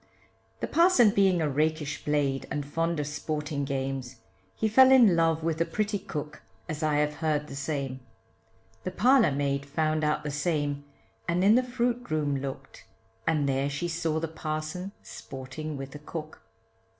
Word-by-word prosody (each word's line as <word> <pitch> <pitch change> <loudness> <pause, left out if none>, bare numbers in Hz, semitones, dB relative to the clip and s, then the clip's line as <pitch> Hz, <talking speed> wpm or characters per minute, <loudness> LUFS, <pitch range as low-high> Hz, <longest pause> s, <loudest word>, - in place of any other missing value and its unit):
The - - -1
parson 335 - +5
being 190 -4 +3
a - - +1
rakish 150 +1 -1
blade, 140 -3 0
and 145 -1 -3
fond 165 +2 -1
of 145 - -1
sporting 150 0 -3
games, 135 -2 -3 0.4
He 220 - 0
fell 260 +5 +7
in 235 -9 +7
love 165 -1 +2
with 165 -1 -1
the 165 - +3
pretty 210 +1 -1
cook, 150 -4 -6 0.3
as 155 -2 -4
I 155 -1 +1
have 150 0 +1
heard 155 -2 0
the 145 - -9
same; 140 -2 -3 0.8
The - - -2
parlour 245 - +4
maid 140 0 0
found 155 +2 0
out 150 0 +1
the 150 - -3
same, 145 -1 -1 0.4
and 175 +2 +1
in 205 +2 +6
the 250 - +5
fruit 245 -2 -2
room 145 -3 0
looked, 135 -1 -7 0.4
And 155 -3 +2
there 135 +1 +1
she 145 +5 -2
saw 165 -1 -1
the 165 - -2
parson 155 +4 -4
sporting 140 +3 -7
with 135 0 -7
the 150 - -9
cook. 155 +1 -7
155 Hz, 170 wpm, -28 LUFS, 145-170 Hz, 0.8 s, fell